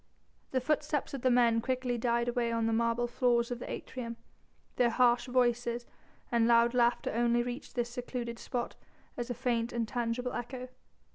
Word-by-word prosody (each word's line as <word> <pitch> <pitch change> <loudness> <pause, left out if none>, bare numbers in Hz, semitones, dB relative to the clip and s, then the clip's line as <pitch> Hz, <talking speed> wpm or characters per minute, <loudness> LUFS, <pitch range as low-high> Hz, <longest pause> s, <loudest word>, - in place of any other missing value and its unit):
The 260 - +1
footsteps 295 +1 0
of 275 - -4
the 255 - +3
men 235 -2 +4
quickly 255 0 -1
died 235 0 +1
away 240 -1 0
on 230 -1 0
the 225 - +1
marble 230 +1 +1
floors 240 0 +1
of 245 - -3
the - - -7
atrium, 235 -2 -5 0.6
their 245 -1 +4
harsh 240 +1 +3
voices 240 -1 +1 0.5
and 230 -1 +3
loud 235 0 +5
laughter 240 -1 +2
only 240 +1 +2
reached 245 +3 -6
this 240 -1 -1
secluded 240 -1 -5
spot 245 -2 -3 0.4
as 240 0 -4
a 245 - -2
faint, 235 -1 0
intangible 240 +1 -2
echo. 250 +1 -5
240 Hz, 165 wpm, -31 LUFS, 235-250 Hz, 0.6 s, loud